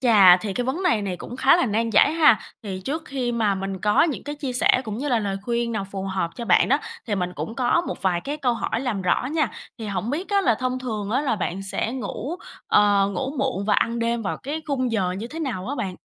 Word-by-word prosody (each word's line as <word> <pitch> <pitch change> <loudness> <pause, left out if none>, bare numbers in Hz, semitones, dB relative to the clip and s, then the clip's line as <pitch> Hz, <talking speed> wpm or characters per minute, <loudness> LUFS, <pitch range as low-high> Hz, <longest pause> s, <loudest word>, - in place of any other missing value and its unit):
chà 205 -8 +7
thì 195 +2 -4
cái 245 +4 -2
vấn 310 +9 -2
này 230 - +2
này 185 -3 -3
cũng 245 - -8
khá 270 +5 +5
là 350 - +2
nan 225 +2 0
giải 250 +8 +5
ha, 305 -9 +5 0.2
thì 190 -3 -5
trước 310 +4 -2
khi 255 -5 -2
mà 215 -4 +1
mình 195 0 -4
có 210 0 +4
những 315 -5 0
cái 290 0 -4
chia 275 -3 -4
sẻ 250 +1 +3
cũng 215 +1 -4
như 290 - -2
là 240 -4 +3
lời 200 -2 -2
khuyên 235 +1 -1
nào 200 -3 -2
phù 195 -1 -4
hợp 190 -3 -2
cho 235 - -5
bạn 185 - +4
đó, 280 +3 +4 0.3
thì 210 - 0
mình 180 -2 -2
cũng 225 - -5
có 255 +7 +2
một - - -3
vài 180 -2 +1
cái 290 +8 -4
câu 255 -5 +1
hỏi 230 0 -2
làm 225 -8 -2
rõ 185 +7 +1
nha. 305 -4 +1 0.3
Thì 220 - -5
hổng 205 +3 -2
biết 340 +8 -3
á 400 -1 +3
là 240 - +3
thông 255 +2 -2
thường 215 -5 -4
á 255 - +1
là 250 -7 0
bạn 190 0 -3
sẽ 205 +4 -2
ngủ, 265 +4 -4 0.3
ờ, 205 -1 +4
ngủ 270 -1 -2
muộn 260 -8 -1
và 210 - +2
ăn 235 +1 +1
đêm 235 0 0
vào 195 - -2
cái 305 +4 -4
khung 255 -4 -1
giờ 185 -4 0
như 205 +5 -5
thế 315 +6 -8
nào 235 - -3
á 285 - -2
bạn? 195 -8 -4
235 Hz, 270 wpm, -23 LUFS, 200-265 Hz, 0.3 s, chà